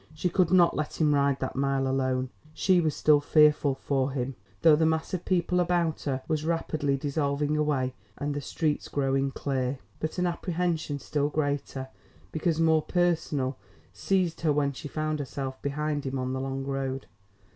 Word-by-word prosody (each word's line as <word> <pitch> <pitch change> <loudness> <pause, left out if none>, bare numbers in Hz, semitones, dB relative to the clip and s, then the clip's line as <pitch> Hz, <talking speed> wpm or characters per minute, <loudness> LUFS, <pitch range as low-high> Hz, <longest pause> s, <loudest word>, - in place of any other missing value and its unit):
She 180 +4 0
could 180 -1 +2
not 175 -2 +5
let 150 - -3
him 150 -2 +4
ride 140 -1 +2
that 130 - -3
mile 135 0 +1
alone. 130 -1 0 0.2
She 185 -2 +3
was 155 -3 0
still 150 -1 +4
fearful 150 -2 +4
for 135 -1 0
him, 135 0 -2 0.3
though 160 -2 +8
the 160 - +1
mass 160 +2 -1
of 180 - -3
people 180 -1 +1
about 175 -2 +1
her 135 -2 -2
was 155 -2 0
rapidly 155 -3 0
dissolving 145 +1 0
away, 145 -4 0 0.2
and 145 0 -2
the 145 - -3
streets 150 +2 -1
growing 135 -1 0
clear. 135 -1 -2 0.2
But 155 +3 -3
an 180 - +1
apprehension 170 -3 -1
still 145 +1 -1
greater, 145 -3 -2 0.4
because 160 0 0
more 160 -1 +4
personal, 160 - 0 0.3
seized 180 -4 0
her 160 -2 +2
when 140 -1 +1
she 145 +3 -7
found 155 +1 -2
herself 135 -1 -5
behind 145 +1 -2
him 135 0 -2
on 130 0 -2
the 130 - -2
long 135 0 -3
road. 135 -1 -3
145 Hz, 175 wpm, -28 LUFS, 135-160 Hz, 0.4 s, though